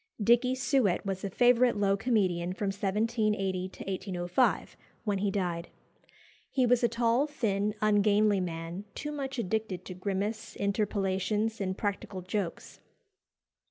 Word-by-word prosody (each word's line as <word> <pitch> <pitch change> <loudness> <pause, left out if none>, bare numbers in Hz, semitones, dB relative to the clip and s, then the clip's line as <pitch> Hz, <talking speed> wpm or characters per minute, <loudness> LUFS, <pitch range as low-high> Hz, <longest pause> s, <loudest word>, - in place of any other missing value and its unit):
Dickey 240 +4 +4
Suett 255 -9 +1
was 190 -1 -3
a 200 - -2
favourite 245 +2 +4
low 200 -1 +3
comedian 190 -6 +1
from 200 +1 -2
1780 200 -2 0
to - - -10
1805, 185 +3 0 0.3
when 205 -3 0
he 200 +1 +1
died. 175 -4 -2 0.8
He 260 -2 +2
was 245 0 +3
a 235 - +4
tall, 235 +4 +2
thin, 210 -7 -1
ungainly 210 -1 +4
man, 170 +2 -5
too 295 - -4
much 270 -2 -4
addicted 215 -4 -2
to 185 - -6
grimace, 205 +4 -3
interpolations, 200 +1 0
and 185 0 -2
practical 200 -2 -3
jokes. 185 -1 -4
205 Hz, 130 wpm, -30 LUFS, 190-230 Hz, 0.8 s, Dickey